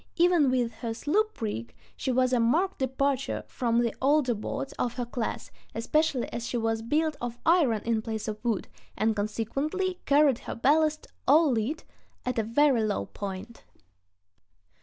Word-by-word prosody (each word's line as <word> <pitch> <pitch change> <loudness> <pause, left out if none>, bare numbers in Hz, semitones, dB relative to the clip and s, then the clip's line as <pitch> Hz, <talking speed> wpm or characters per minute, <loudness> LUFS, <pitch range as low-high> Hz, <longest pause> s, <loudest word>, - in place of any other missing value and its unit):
Even 345 -5 +4
with 245 -2 +1
her 225 0 -5
sloop 415 - 0
rig 115 - -4 0.2
she 260 - -2
was 255 0 +2
a 250 - +3
marked 320 +12 +2
departure 265 +1 0
from 235 -2 -1
the 235 - 0
older 275 -2 +3
boats 225 +5 -4
of 240 -1 -1
her 245 - -2
class, 235 -1 -4 0.2
especially 270 +3 +1
as 235 0 -3
she 240 - -2
was 225 -1 0
built 300 +6 0
of 240 -1 -4
iron 300 - +3
in 230 -1 0
place 220 -1 -4
of 215 +1 -5
wood, 230 -5 -1 0.3
and 220 0 +2
consequently 275 - -2
carried 280 -3 +4
her - - -6
ballast, 305 +5 +2 0.2
all 305 +1 +6
lead, 250 +8 -1 0.4
at 250 -2 -1
a - - +1
very 240 +1 +3
low 205 - -1
point. 200 - -7
245 Hz, 160 wpm, -28 LUFS, 225-295 Hz, 0.4 s, all